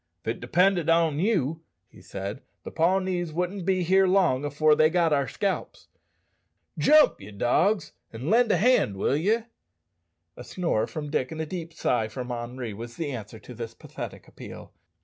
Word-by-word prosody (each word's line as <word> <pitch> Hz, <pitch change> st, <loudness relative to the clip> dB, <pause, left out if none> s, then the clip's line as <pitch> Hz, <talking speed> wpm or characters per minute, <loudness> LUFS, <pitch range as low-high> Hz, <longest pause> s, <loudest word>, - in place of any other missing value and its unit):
"If -, -, -4 dB
it -, -, -3 dB
depended 180 Hz, -2 st, +2 dB
on 165 Hz, -3 st, +3 dB
you," 165 Hz, -, 0 dB, 0.3 s
he -, -, -18 dB
said, 100 Hz, +6 st, -6 dB, 0.2 s
"the -, -, -7 dB
Pawnees 180 Hz, 0 st, 0 dB
wouldn't 180 Hz, +3 st, -3 dB
be 185 Hz, -3 st, +1 dB
long 185 Hz, -8 st, +3 dB
afore 150 Hz, +2 st, +3 dB
they 155 Hz, +1 st, +4 dB
got 165 Hz, -2 st, +2 dB
our 140 Hz, -2 st, +1 dB
scalps. 200 Hz, -2 st, -3 dB, 0.9 s
Jump, 305 Hz, -, +5 dB
ye 100 Hz, -, -10 dB
dogs, 125 Hz, -, +1 dB, 0.2 s
an' 115 Hz, +5 st, -7 dB
lend 240 Hz, +1 st, +4 dB
a -, -, +3 dB
hand, 225 Hz, -, +3 dB
will 115 Hz, -, +1 dB
ye?" 210 Hz, +9 st, +1 dB, 0.9 s
A -, -, -9 dB
snore 170 Hz, -12 st, -1 dB
from 150 Hz, -2 st, -6 dB
Dick 130 Hz, -4 st, -1 dB
and 160 Hz, -, -6 dB
a 160 Hz, -, -1 dB
deep 165 Hz, 0 st, -6 dB
sigh 125 Hz, -8 st, 0 dB
from 125 Hz, +3 st, -6 dB
Henri 120 Hz, -1 st, -5 dB
was 115 Hz, +3 st, -8 dB
the 155 Hz, -3 st, -3 dB
answer 110 Hz, -3 st, -7 dB
to 125 Hz, -, -11 dB
this 115 Hz, -1 st, -7 dB
pathetic -, -, -9 dB
appeal. -, -, -11 dB
160 Hz, 170 wpm, -26 LUFS, 125-185 Hz, 0.9 s, Jump